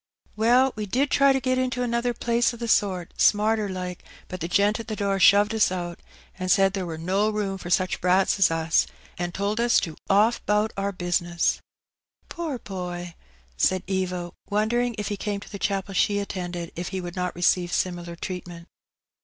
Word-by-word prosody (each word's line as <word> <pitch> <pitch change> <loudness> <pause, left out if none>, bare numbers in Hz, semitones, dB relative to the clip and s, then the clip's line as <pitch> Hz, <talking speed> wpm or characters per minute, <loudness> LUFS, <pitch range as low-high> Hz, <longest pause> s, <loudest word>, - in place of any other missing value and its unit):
" - - -68
Well, 245 +4 +4
we 210 -1 -4
did 270 +7 0
try 275 0 +5
to 270 - +2
get 255 0 0
into 250 -1 -1
another 235 0 0
place 235 +1 +1
o' - - -11
the 235 0 -4
sort, 185 -6 +1
smarter 215 0 +3
like, 180 -1 -5 0.3
but 185 - -6
the 165 - -2
gent 205 +5 +2
at 225 - -7
the 215 - -3
door 200 -1 0
shoved 205 +3 +6
us 220 -4 +3
out, 175 -2 -4 0.4
an' 185 0 -3
said 195 0 +4
there 190 -3 -3
wur 160 -1 -5
no 190 +6 +1
room 205 -3 -2
for 175 - -7
such 185 +1 +1
brats 185 +2 +3
as 195 - +5
us, 165 0 +2 0.3
an' 175 0 -2
told 200 +4 -2
us 240 0 +4
to 160 -2 -5
off 215 +4 +3
'bout 210 +1 +2
our 200 0 -1
bizness.'^ 175 -2 0 0.4
*' - - -43
Poor 325 -6 -3
boy! 180 -4 -6 0.2
" 60 0 -33
said 185 -1 +2
Eva, 185 -2 -2 0.2
wondering 235 +3 +1
if 210 0 -3
he 205 - -3
came 205 0 -3
to - - -13
the 200 - -6
chapel 195 0 -2
she 205 +2 +2
attended 180 -4 -4
if 175 +1 -4
he 190 - -3
would 175 -1 -6
not 180 -1 -2
receive 175 0 +2
similar 175 -2 -2
treatment. 175 -1 -7
195 Hz, 205 wpm, -25 LUFS, 180-215 Hz, 0.4 s, shoved